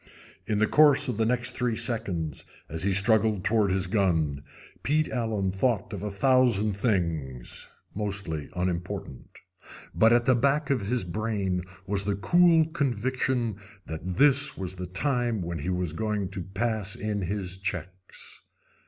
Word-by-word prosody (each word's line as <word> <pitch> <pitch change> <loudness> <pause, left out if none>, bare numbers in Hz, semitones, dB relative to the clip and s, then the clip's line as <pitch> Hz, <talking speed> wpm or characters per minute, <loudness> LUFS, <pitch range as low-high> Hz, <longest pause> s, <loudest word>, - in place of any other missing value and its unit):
In 105 - 0
the 110 - +4
course 145 +2 +5
of 125 -5 -2
the 110 -1 +1
next 120 0 0
three 125 -2 0
seconds, 95 - -2 0.2
as 80 +1 -3
he 100 +2 +2
struggled 105 0 +5
toward 105 -1 +2
his 95 0 0
gun, 85 -8 +1 0.4
Pete 155 +2 +1
Allen 110 -6 -1
thought 105 +1 0
of 100 - -5
a 105 - -3
thousand 110 -1 +3
things, 85 - -2 0.2
mostly 100 -8 -3
unimportant. 90 -6 -4 0.6
But 110 +1 +4
at 120 0 +4
the 130 - +5
back 140 +4 +1
of 130 -5 +1
his 115 +4 -1
brain 95 -1 -2 0.2
was 100 -1 0
the 100 -1 0
cool 170 - +4
conviction 130 - -1 0.3
that 85 +3 -5
this 145 -1 +3
was 95 -1 -4
the 90 -1 -6
time 120 +2 -1
when 85 -1 -4
he 85 - -4
was 90 -3 -1
going 105 0 -2
to 95 -1 -6
pass 100 +2 -2
in 105 -1 -3
his 95 0 -3
checks. 95 0 -6
105 Hz, 155 wpm, -27 LUFS, 90-120 Hz, 0.6 s, course